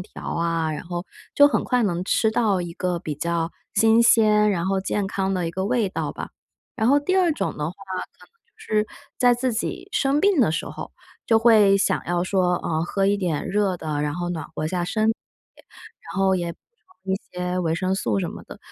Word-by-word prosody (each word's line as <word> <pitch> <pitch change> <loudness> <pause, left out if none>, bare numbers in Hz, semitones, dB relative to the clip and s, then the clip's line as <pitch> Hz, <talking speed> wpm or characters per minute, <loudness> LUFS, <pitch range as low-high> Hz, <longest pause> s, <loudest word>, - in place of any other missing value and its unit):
条 180 - -10
啊， 165 -1 0
然 155 - -5
后 175 0 -5 0.3
就 285 0 +7
很 - - 0
快 250 -1 +1
能 180 -4 -1
吃 220 +3 +2
到 215 -5 +1
一 170 - -6
个 175 0 -2
比 155 - -4
较 170 +1 -1 0.2
新 225 0 +5
鲜， 215 -2 +5
然 170 -1 -1
后 190 0 0
健 195 0 -2
康 195 0 -1
的 175 -2 -1
一 - - -4
个 190 +3 -3
味 220 -2 +1
道 - - -3
吧。 - - -7 0.5
然 220 -1 +1
后 285 +3 +5
第 370 +6 0
二 360 -3 +3
种 295 - -3
的 150 - -2
话， 180 - -8 0.5
可 - - -16
能 - - -33
就 465 0 -43
是 215 - -1 0.3
在 245 -1 +5
自 250 0 -1
己 235 - -4
生 290 -8 +1
病 400 -4 +3
的 180 -9 +3
时 165 - -2
候， - - -8 0.3
就 225 - +4
会 215 -4 +5
想 200 - +1
要 175 0 0
说， 185 -1 +1
呃， 160 0 -1
喝 195 +2 -1
一 205 - +3
点 175 -7 -2
热 200 -2 +1
的， 155 -3 -3
然 145 0 -2
后 175 0 -3
暖 165 -3 -4
和 155 - -2
下 175 -1 -1
身 215 +4 0
体， 225 - -1 1.0
然 195 - -4
后 190 0 +3
也 170 -2 -2
补 - - -21 0.5
充 190 0 0
一 - - -1 0.2
些 180 0 -2
维 165 -2 0
生 185 +2 0
素 115 - -1
什 - - -2
么 - - -9
的。 - - -11
190 Hz, 245 characters per minute, -23 LUFS, 175-225 Hz, 1.0 s, 就